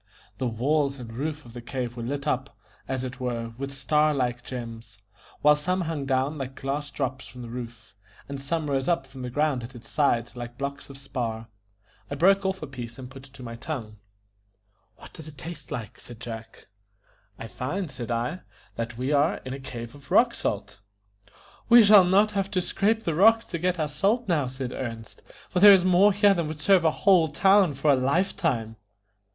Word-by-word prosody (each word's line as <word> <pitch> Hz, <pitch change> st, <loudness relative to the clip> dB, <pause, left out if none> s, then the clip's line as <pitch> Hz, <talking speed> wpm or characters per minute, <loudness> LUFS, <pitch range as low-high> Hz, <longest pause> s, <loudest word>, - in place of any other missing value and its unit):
The 130 Hz, -, 0 dB
walls 140 Hz, +4 st, 0 dB
and 115 Hz, -3 st, -9 dB
roof 150 Hz, +4 st, -4 dB
of 120 Hz, -, -13 dB
the 120 Hz, -, -7 dB
cave 120 Hz, 0 st, -4 dB
were 120 Hz, -, -6 dB
lit 140 Hz, +4 st, -4 dB
up, 130 Hz, -2 st, -2 dB, 0.3 s
as 130 Hz, -1 st, -2 dB
it 130 Hz, +1 st, -6 dB
were, 115 Hz, -2 st, -3 dB
with 140 Hz, 0 st, -4 dB
star 150 Hz, +2 st, +2 dB
like 125 Hz, -2 st, -1 dB
gems, 115 Hz, -4 st, -8 dB, 0.5 s
while 150 Hz, 0 st, +7 dB
some 180 Hz, +5 st, -1 dB
hung 160 Hz, -5 st, -3 dB
down 135 Hz, +3 st, 0 dB
like 135 Hz, 0 st, -5 dB
glass 145 Hz, +2 st, -3 dB
drops 130 Hz, -2 st, -4 dB
from 125 Hz, -1 st, -10 dB
the 120 Hz, -, -8 dB
roof, 115 Hz, -4 st, -8 dB, 0.3 s
and 140 Hz, -1 st, -6 dB
some 155 Hz, +2 st, -2 dB
rose 135 Hz, -2 st, -1 dB
up 170 Hz, -6 st, +1 dB
from 135 Hz, -1 st, -11 dB
the 125 Hz, -, -4 dB
ground 145 Hz, -1 st, 0 dB
at 125 Hz, +3 st, -9 dB
its 115 Hz, -1 st, -11 dB
sides 135 Hz, -6 st, +1 dB
like 120 Hz, 0 st, -7 dB
blocks 140 Hz, +1 st, -5 dB
of 135 Hz, -, -10 dB
spar. 120 Hz, -5 st, -4 dB, 0.6 s
I 140 Hz, -, -3 dB
broke 195 Hz, +5 st, +4 dB
off 190 Hz, -3 st, -3 dB
a -, -, -2 dB
piece 120 Hz, -4 st, -8 dB
and 130 Hz, -1 st, -9 dB
put 135 Hz, 0 st, -12 dB
it 135 Hz, 0 st, -18 dB
on -, -, -8 dB
my 115 Hz, -, -6 dB
tongue. 115 Hz, -4 st, -6 dB, 1.0 s
"What -, -, -14 dB
does 160 Hz, -1 st, -10 dB
it 150 Hz, -2 st, -12 dB
taste 170 Hz, +2 st, -8 dB
like?" 110 Hz, -4 st, -6 dB
said 120 Hz, -2 st, -12 dB
Jack. 115 Hz, -2 st, -8 dB, 0.7 s
"I -, -, -7 dB
find," 150 Hz, -, -4 dB
said 125 Hz, -3 st, -6 dB
I, 120 Hz, +9 st, -2 dB, 0.4 s
"that 115 Hz, 0 st, -4 dB
we 130 Hz, +3 st, -1 dB
are 145 Hz, +2 st, +3 dB
in 130 Hz, -, -4 dB
a 135 Hz, -, -6 dB
cave 120 Hz, -3 st, -7 dB
of 145 Hz, -1 st, -15 dB
rock -, -, +4 dB
salt." -, -, -4 dB, 0.9 s
"We 235 Hz, -1 st, +9 dB
shall 205 Hz, -3 st, +8 dB
not 200 Hz, +4 st, +4 dB
have 195 Hz, -1 st, -1 dB
to 190 Hz, -3 st, 0 dB
scrape 215 Hz, +5 st, 0 dB
the 165 Hz, -, -1 dB
rocks 225 Hz, +7 st, +5 dB
to 170 Hz, -, -5 dB
get 180 Hz, 0 st, 0 dB
our 155 Hz, -, +1 dB
salt 200 Hz, +11 st, 0 dB
now," 155 Hz, -7 st, +1 dB
said 130 Hz, -1 st, -5 dB
Ernest, 115 Hz, -4 st, -6 dB, 0.3 s
"for 180 Hz, -, -1 dB
there 200 Hz, +1 st, +10 dB
is 185 Hz, -1 st, +1 dB
more 185 Hz, +3 st, +5 dB
here 205 Hz, 0 st, +4 dB
than 170 Hz, -4 st, -1 dB
would 155 Hz, 0 st, -6 dB
serve 180 Hz, +1 st, +4 dB
a -, -, +6 dB
whole 175 Hz, 0 st, +4 dB
town 190 Hz, +1 st, +4 dB
for 145 Hz, +2 st, +3 dB
a -, -, +5 dB
lifetime." 135 Hz, -, 0 dB
140 Hz, 205 wpm, -26 LUFS, 125-165 Hz, 1.0 s, there